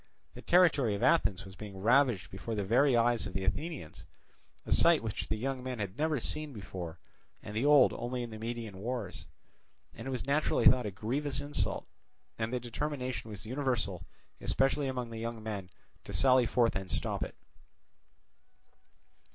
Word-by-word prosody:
The - - -10
territory 150 - +4
of 100 - -4
Athens 130 - +3
was 95 -1 -11
being 100 -1 -8
ravaged 120 0 +3
before 105 +4 -5
the 105 - -1
very 120 +6 +4
eyes 115 -2 +2
of 95 - -8
the 95 - -2
Athenians, 145 - -3 0.6
a - - -7
sight 165 -6 +5
which 110 -2 -3
the - - -1
young 130 +3 -3
men 125 -1 -4
had 100 -3 -4
never 155 0 0
seen 150 +4 -2
before 90 -5 -7 0.5
and 105 - -7
the 120 +6 +1
old 145 -3 +7
only 120 +1 -3
in 120 - -7
the 110 - -7
Median 115 -4 -5
wars; 110 -4 -4 0.7
and - - -8
it - - -2
was 125 -3 -3
naturally 145 +3 +1
thought 125 -3 +6
a - - -1
grievous 135 +9 -2
insult, 145 +1 -1 0.5
and 110 +1 -1
the 125 - 0
determination 125 0 -4
was 105 -1 -7
universal, 120 -7 -1 0.4
especially 135 +1 +1
among 125 -3 -3
the 115 - -6
young 115 -1 -5
men, 100 -4 -5 0.4
to - - -7
sally 130 -2 +4
forth 120 -2 +2
and 95 -1 -3
stop - - -2
it. - - -4
120 Hz, 175 wpm, -32 LUFS, 105-135 Hz, 0.7 s, old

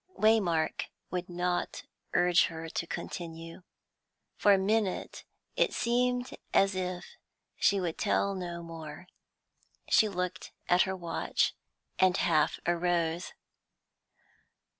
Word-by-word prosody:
Waymark 195 -8 +2 0.3
would 180 0 -3
not 175 0 -2 0.3
urge 175 0 +5
her 165 0 -6
to 170 - -3
continue. 165 0 -6 0.7
For 205 - +4
a 200 - +7
minute 205 0 -1 0.3
it - - +2
seemed 245 +1 0 0.2
as 195 0 +5
if 180 -1 -3 0.5
she 200 - +3
would 175 -3 -3
tell 200 -1 +1
no 175 -2 -5
more; 160 -1 -8 0.8
she 215 - +5
looked 180 -2 -4
at 180 +1 +5
her 190 - -1
watch, 170 -2 0 0.5
and 185 0 +4
half 155 -3 +2
arose. 175 0 0
180 Hz, 110 wpm, -30 LUFS, 170-195 Hz, 0.8 s, a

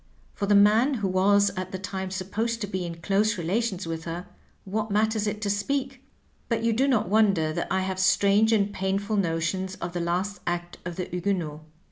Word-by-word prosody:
For 200 - -3
the 205 - +4
man 220 +7 +5
who 205 -5 -1
was 200 +2 +3
at 185 0 -4
the 190 - -3
time 190 -1 -4
supposed 205 +5 -2
to - - 0
be 185 -3 -3
in 170 0 -8
close 210 +3 +2
relations 190 +2 -1
with 165 0 -5
her, 170 +2 -5 0.4
what 210 +2 -2
matters 215 +1 +1
it 210 +1 -3
to 205 - 0
speak 265 +6 -2 0.2
% - - -38
But 230 -1 0
you 230 0 +2
do 260 +5 +2
not 245 -9 +2
wonder 195 -6 +3
that - - -2
I 190 +1 +1
have 190 0 -3
strange 200 +3 +4
and 205 -2 +2
painful 195 +3 -1
notions 185 +1 -1
of 170 -1 -6
the 175 - -2
last 180 +4 -1
act 175 0 -3
of 175 -1 -4
the 180 - -3
^ - - -16
Huguenots.' 175 -4 -2
195 Hz, 210 wpm, -26 LUFS, 180-215 Hz, 0.4 s, man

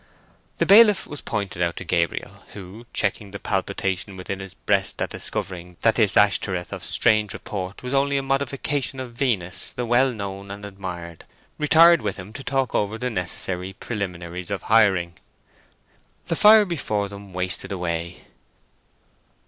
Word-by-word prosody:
The - - +2
bailiff 210 -1 +7
was 145 - -8
pointed 100 -4 -3
out 85 -1 0
to - - -6
Gabriel, 85 -1 -2
who, 105 +4 -10
checking 100 0 -1
the 100 - -7
palpitation 95 -1 -2
within 95 +1 -5
his 95 -2 -9
breast - - 0
at - - -2
discovering 90 -1 -5
that 115 - +5
this 110 -4 +2
Ashtoreth 100 -4 +2
of - - -7
strange 105 -1 +3
report 95 +1 -6
was 125 +1 -4
only 140 0 +2
a 135 - -1
modification 135 -1 -1
of 125 -2 -6
Venus 100 -8 -1
the 125 - -4
well 125 +3 +3
known 100 -3 -6
and 100 +1 -7
admired, 90 -4 -7 0.4
retired 165 +2 +6
with 105 -3 -2
him 95 +4 -10
to 135 - -8
talk 135 -1 -1
over 105 +1 0
the 125 +2 -3
necessary 90 0 -3
preliminaries 90 -5 -5
of 100 -1 -3
hiring. 95 -6 +4 1.1
The 165 - +1
fire 215 +3 +7
before 110 - -2
them 100 0 -11
wasted 90 +2 -3
away. 85 -2 -3
100 Hz, 155 wpm, -23 LUFS, 90-125 Hz, 1.1 s, bailiff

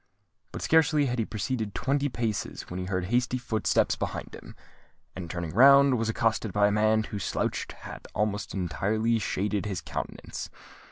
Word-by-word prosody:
But - - -6
scarcely 155 -2 +4
had 125 -2 -1
he 110 - +1
proceeded 110 -1 -3
twenty 140 +1 0
paces, 110 -9 -3
when 90 - -4
he 90 - -4
heard 95 -1 -1
hasty 125 +1 +2
footsteps 110 -4 +1
behind - - -5
him; - - -11 0.6
and, 90 -3 -6
turning 85 -2 -4
round, 140 +3 +7
was 115 0 0
accosted 115 -1 0
by 105 +2 +3
a 105 - +3
man 110 +1 +3
whose 105 -3 -5
slouched - - -2
hat - - -10
almost 105 -1 -1
entirely 110 +6 0
shaded 105 +1 -1
his 95 -4 -3
countenance. - - -6
110 Hz, 165 wpm, -28 LUFS, 100-125 Hz, 0.6 s, round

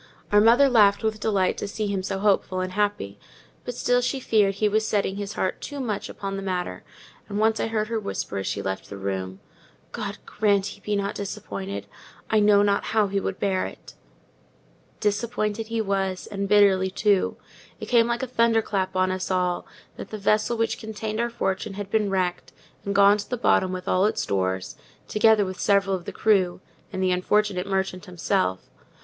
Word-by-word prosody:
Our 205 0 +6
mother 240 +6 +6
laughed 210 -5 +4
with 220 -1 -1
delight 200 -4 +1
to - - -3
see 215 +1 -3
him 200 -2 -1
so 195 +1 -3
hopeful 195 -2 +1
and 185 0 -2
happy: 190 - -1 0.4
but 245 - -5
still 245 0 +2
she 265 +2 -1
feared 210 -5 +2
he 210 +2 +1
was 215 +1 +1
setting 200 -2 0
his 205 0 -4
heart 185 - -2
too 285 -1 -6
much 215 -6 -3
upon 195 0 -5
the - - -4
matter; 185 -2 -3 0.5
and 205 - -3
once 220 +1 +2
I - - 0
heard 215 -1 -1
her 230 -1 -1
whisper 150 - -4
as 95 - -4
she 100 - -2
left 95 0 -4
the 100 - -7
room, 95 -1 -4 0.5
"God - - -5
grant 205 -2 +1
he 200 0 -7
be 210 0 -1
not 200 0 -1
disappointed! 100 - -5 0.5
I 220 - +4
know 205 -1 +5
not 200 0 +1
how 215 -2 +1
he 200 0 0
would 190 0 -4
bear 190 -2 0
it." - - -12 1.1
Disappointed 215 0 -1
he 230 0 -1
was; 195 -2 -1
and 200 -1 -4
bitterly, 195 -2 +5
too. 200 0 +1 0.4
It - - -5
came 235 -2 +4
like 235 +1 -1
a - - -2
thunder 230 -2 +2
clap 190 -3 -2
on 185 0 +2
us 185 0 -3
all, 180 -1 0 0.3
that - - -8
the 215 - -5
vessel 215 +3 +1
which 230 0 0
contained 220 0 -5
our 235 0 +1
fortune 195 -3 -2
had 200 -1 -6
been 215 -2 +2
wrecked, 185 -2 -1 0.3
and 200 0 -3
gone 200 +1 +6
to 205 - -6
the 245 - -2
bottom 190 -5 +2
with 185 0 -6
all 185 +1 +3
its - - -1
stores, 95 -1 -2 0.3
together 215 -1 +4
with 185 -1 -6
several 195 -1 +2
of 175 -2 -7
the - - -5
crew, 190 -5 +2 0.3
and 190 - -2
the 185 - +2
unfortunate 190 +1 +1
merchant 190 -1 -2
himself. 95 - 0
200 Hz, 200 wpm, -25 LUFS, 185-215 Hz, 1.1 s, Our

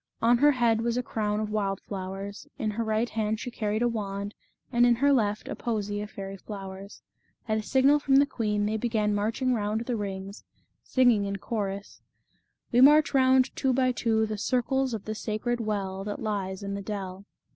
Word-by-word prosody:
On 235 +1 +4
her 295 +2 +6
head 235 -3 +2
was 235 +1 0
a 250 - 0
crown 210 -2 -1
of 215 -1 -3
wild 195 -2 -1
flowers, 195 +1 -6
in 215 -2 -1
her 230 +2 -2
right 220 +1 0
hand 220 -1 -1
she 245 - -5
carried 215 0 -1
a - - +4
wand, 200 -3 -3 0.4
and 240 -1 +3
in 240 - +5
her 280 +4 +3
left 210 -4 0
a - - -4
posy 205 -3 -2
of 210 - -6
fairy 195 -1 -7
flowers. 195 0 -9 0.4
At 215 0 +1
a - - -2
signal 270 +6 +4
from 275 -2 +2
the 280 +1 +7
queen 210 -6 -1
they 215 +1 0
began 220 -2 0
marching 225 +5 0
round 215 -1 -1
the 235 +1 -2
rings, 195 -1 -5 0.4
singing 245 -6 +3
in 200 0 -2
chorus: 200 -1 -4 0.3
" - - -46
We 245 0 +4
march 300 +3 +6
round 260 -1 +4
by - - -8
two 265 -2 +2 0.2
and - - -8
two 220 -2 +1
The 215 -1 -4
circles 260 +2 0
of 210 - -7
the 215 - -3
sacred 220 +3 -2
well 195 -3 -2
That 205 0 -4
lies 200 -3 -3
in 200 0 -3
the 200 - -4
dell." 195 -1 -6
215 Hz, 205 wpm, -27 LUFS, 200-240 Hz, 0.4 s, the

